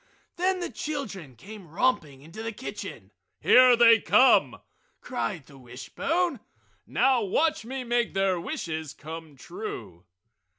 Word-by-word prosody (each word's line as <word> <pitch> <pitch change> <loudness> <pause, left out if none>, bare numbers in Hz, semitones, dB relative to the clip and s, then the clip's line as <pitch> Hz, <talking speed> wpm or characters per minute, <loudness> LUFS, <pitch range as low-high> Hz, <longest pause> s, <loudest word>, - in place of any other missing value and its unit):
Then 370 +1 0
the 350 - -4
children 215 - -6
came 200 - -12
romping 155 - -1
into 165 +8 -10
the 225 0 -4
kitchen. 240 +4 -8 0.3
"Here 250 -1 +6
they 230 -1 +6
come!" 260 +5 +4 0.4
cried 195 - -4
the 140 -2 -16
wishbone. 325 - -2 0.5
"Now 260 -3 +2
watch 305 - 0
me 260 +2 -5
make 240 -4 -1
their 195 -2 +1
wishes 160 -3 -5
come 160 0 -9
true!" 365 - -8
220 Hz, 125 wpm, -26 LUFS, 160-260 Hz, 0.5 s, Here